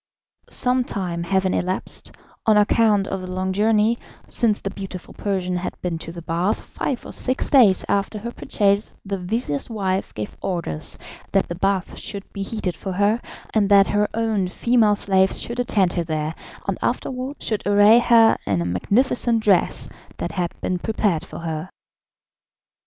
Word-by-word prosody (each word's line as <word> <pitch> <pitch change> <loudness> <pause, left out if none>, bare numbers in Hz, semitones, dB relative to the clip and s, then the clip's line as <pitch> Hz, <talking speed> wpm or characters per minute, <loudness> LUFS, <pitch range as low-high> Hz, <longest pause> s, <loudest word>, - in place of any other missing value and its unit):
Some 250 0 +2
time 180 -7 -3
having 190 +1 +1
elapsed, 185 +1 -2 0.4
on 215 -1 +6
account 210 -1 +3
of 195 - -3
the 185 - -6
long 185 +1 -2
journey, 215 +3 +3 0.3
since 220 -3 +1
the 195 - -4
beautiful 190 -3 -8
Persian 185 -3 -2
had 180 - -5
been 170 -2 -2
to 165 - -7
the 170 -1 -9
bath, 175 +5 0
five 260 -4 -4
or - - -7
six 255 +1 -1
days 225 -9 +6
after 200 +1 0
her 235 +3 -5
purchase 200 -3 0
the 195 -1 -3
vizir's 180 - -2
wife 195 -4 -1
gave 105 -1 -5
orders 170 - -3 0.4
that 195 - +2
the - - -2
bath 195 +1 -1
should 200 -1 -5
be 200 - -5
heated 195 -4 -2
for 190 +3 -5
her, 205 +5 +2 0.3
and 205 -2 +2
that 200 -1 +7
her 210 0 +2
own 220 -4 +1
female 220 +2 +3
slaves 190 -1 +2
should 240 +1 -5
attend 200 -7 +2
her 175 - 0
there, 155 -1 -2 0.3
and - - -1
after - - -1
wards 260 +3 -6
should 215 -2 -1
array 205 +3 +7
her 235 -2 +6
in 100 -3 +1
a 85 - -1
magnificent 225 - +1
dress 195 -4 +2 0.3
that - - -3
had 175 -3 -2
been 180 -1 -1
prepared 205 -5 0
for - - -9
her. 160 +1 -4
195 Hz, 170 wpm, -22 LUFS, 180-220 Hz, 0.4 s, that